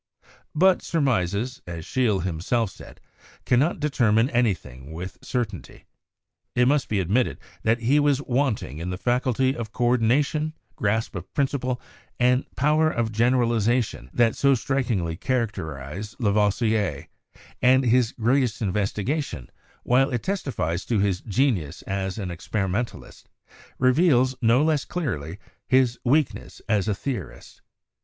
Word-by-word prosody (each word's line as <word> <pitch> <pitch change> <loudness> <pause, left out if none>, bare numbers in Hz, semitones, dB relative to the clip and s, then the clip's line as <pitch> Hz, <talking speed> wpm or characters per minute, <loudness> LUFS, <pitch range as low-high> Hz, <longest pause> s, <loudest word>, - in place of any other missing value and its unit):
But 185 +3 +4
surmises, 125 - 0
as 85 -2 -6
Scheele 110 -8 +1
himself 95 +5 -1
said, - - -13 0.5
cannot 135 +8 +2
determine 120 -5 +2
anything 85 - -1
with 90 +3 -7
certainty. 110 -8 -4 0.7
It 125 0 +4
must 140 0 +2
be 105 - +1
admitted 105 +8 0 0.2
that 115 +2 +1
he 135 +6 +3
was 145 -2 +3
wanting 120 - -1
in 85 +2 -4
the 90 - -3
faculty 130 +3 +1
of 115 -3 -5
coordina 120 +4 +2
tion, 155 +2 -3 0.2
grasp 110 +1 -1
of 90 0 -7
principle, 130 -3 0 0.4
and 125 +1 +3
power 155 +3 +3
of 115 -6 -1
generalization 115 - +1
that 115 -2 +2
so 140 -1 +4
strikingly 115 -11 -1
characterize 100 - -3
Lavoisier; 105 -1 +1 0.5
and 130 +1 +5
his 120 -1 +3
greatest 120 0 +1
in 105 -5 -1
vestigation, 105 - -2 0.3
while 130 +2 +3
it 120 -4 -2
testifies 110 - -2
to 115 - 0
his 95 -2 +1
genius 105 - 0
as 95 0 -3
an 95 -4 -4
experimen 95 +5 -1
talist, - - -14 0.5
reveals, 130 -1 +3
no 120 +4 +4
less 155 -3 +2
clearly, 95 - -4 0.3
his 130 -2 +3
weakness 145 +4 0
as 105 -3 +1
a 105 - +1
theorist. 120 -3 -6
120 Hz, 130 wpm, -24 LUFS, 100-130 Hz, 0.7 s, and